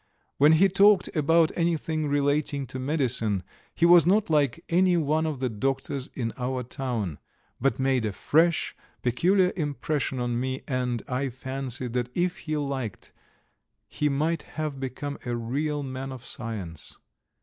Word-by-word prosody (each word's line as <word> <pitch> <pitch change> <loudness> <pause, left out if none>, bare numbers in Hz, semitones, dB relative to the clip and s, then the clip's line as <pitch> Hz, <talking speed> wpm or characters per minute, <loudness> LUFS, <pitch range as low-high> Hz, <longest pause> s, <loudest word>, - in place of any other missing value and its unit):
When 150 +3 +6
he 180 +5 +6
talked 195 0 +4
about 160 +1 +4
anything 160 -2 0
relating 145 0 +1
to 130 - -4
medicine 125 - 0 0.3
he 170 - +3
was 170 -2 +7
not 200 -1 +3
like 145 -5 +2
any 180 +1 +3
one 160 0 +1
of 150 -4 -3
the 130 - 0
doctors 135 +3 -2
in 115 -3 -2
our 125 0 -2
town, 115 - -3 0.4
but 135 - +1
made 130 -3 +1
a 105 - -1
fresh, 165 - +2 0.3
peculiar 180 +10 +3
impression 145 -4 -2
upon 120 -1 -1
me, 130 +1 -3
and 125 -3 -1
I 135 +1 -1
fancied 130 -1 -5
that 125 -1 -1
if 175 0 0
he 155 -1 -3
liked 135 -7 -4 0.8
he 150 - 0
might 155 +4 0 0.2
have 155 -3 -2
become 140 +2 -5
a 120 -1 -2
real 145 +6 -2
man 135 0 -5
of 130 -2 -9
science. 100 -9 -5
135 Hz, 150 wpm, -26 LUFS, 125-155 Hz, 0.8 s, was